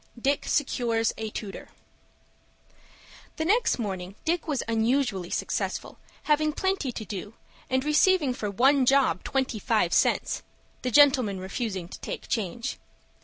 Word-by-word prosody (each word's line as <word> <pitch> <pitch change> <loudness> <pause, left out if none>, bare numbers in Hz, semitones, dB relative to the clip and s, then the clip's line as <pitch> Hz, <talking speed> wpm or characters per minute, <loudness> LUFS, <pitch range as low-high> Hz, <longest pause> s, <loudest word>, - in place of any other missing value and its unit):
DICK 275 +4 0
SECURES 235 -5 +1
A 220 -1 -3
TUTOR 210 -2 -7 1.7
The 315 - -2
next 450 +7 +3
morning 190 -4 -4
Dick 335 +1 0
was 285 -5 -1
unusually 225 -4 +1
successful, - - -3 0.2
having 305 0 +2
plenty 380 -7 -1
to 225 -2 -6
do, 205 +2 -7 0.3
and 260 +1 +1
receiving 300 -2 +3
for 210 -4 -4
one 260 +6 +3
job 265 -11 +3
twenty 265 -5 -1
five - - +1
cents,—the 255 - -1
gentleman 255 -7 +5
refusing 190 -1 -4
to - - -10
take - - -6
change. 230 +3 -3
245 Hz, 125 wpm, -27 LUFS, 210-285 Hz, 1.7 s, gentleman